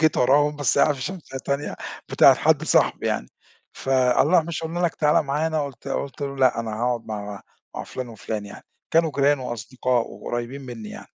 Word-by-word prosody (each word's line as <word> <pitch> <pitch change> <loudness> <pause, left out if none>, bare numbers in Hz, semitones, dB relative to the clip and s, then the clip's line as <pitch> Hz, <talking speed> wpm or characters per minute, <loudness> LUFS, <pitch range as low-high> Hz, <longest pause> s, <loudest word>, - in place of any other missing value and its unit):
جيت 155 -1 +3
وراهم، 145 +4 +3
بس 145 -3 +1
قاعد 150 - +4
فى 135 - -10
شمسية 155 -4 -6
تانية، 140 +2 -3 0.3
بتاعة - - +7
حد - - +2
صاحبي - - +2
يعني، 60 - -1 0.4
ف - - -10
الله 135 +6 +4
مش 165 0 -5
قُلنا 165 +2 -3
لك 175 -2 +1
تعالَ 150 0 +3
معانا 150 +2 0
قُلت 135 -1 -9
قُلت 140 +1 -4
له 140 -1 -3
لأ 130 -3 +3
أنا 115 - -4
هاقعد 120 +1 -1
مع 105 -2 -6 0.3
مع - - -5
فلان 130 -1 -6
وفلان 110 -1 -5
يعني، 100 - -12 0.3
كانوا 165 -1 +3
جيران 140 +1 +3
وأصدقاء 125 0 -2
وقريبين 120 +6 -5
مني 120 -5 -8
يعني. - - -10
135 Hz, 190 wpm, -24 LUFS, 120-150 Hz, 0.4 s, بتاعة